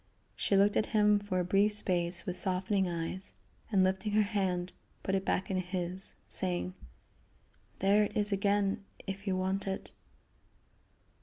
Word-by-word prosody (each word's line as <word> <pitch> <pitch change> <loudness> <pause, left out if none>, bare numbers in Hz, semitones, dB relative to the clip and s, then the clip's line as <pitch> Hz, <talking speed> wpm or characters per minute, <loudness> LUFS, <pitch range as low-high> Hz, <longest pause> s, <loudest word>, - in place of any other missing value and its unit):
She 200 - +1
looked 200 +1 +4
at - - +2
him 210 0 +5
for 200 -3 -2
a - - +1
brief 200 +3 +3
space 175 -3 +2
with 180 -3 -2
softening 190 +1 +1
eyes, 170 +3 -4 0.4
and, 195 -3 +4
lifting 190 +3 0
her 215 0 +4
hand, 185 -4 -1 0.3
put 190 - -2
it 195 0 +1
back 190 0 -1
in 190 - 0
his, 185 0 -2
saying: 180 0 -2 1.0
"There 205 +2 +4
it - - -5
is 210 0 +2
again 200 0 +1 0.2
if 195 +1 -6
you 185 -1 +1
want 190 +1 -1
it." 190 0 -4
195 Hz, 155 wpm, -31 LUFS, 185-205 Hz, 1.0 s, him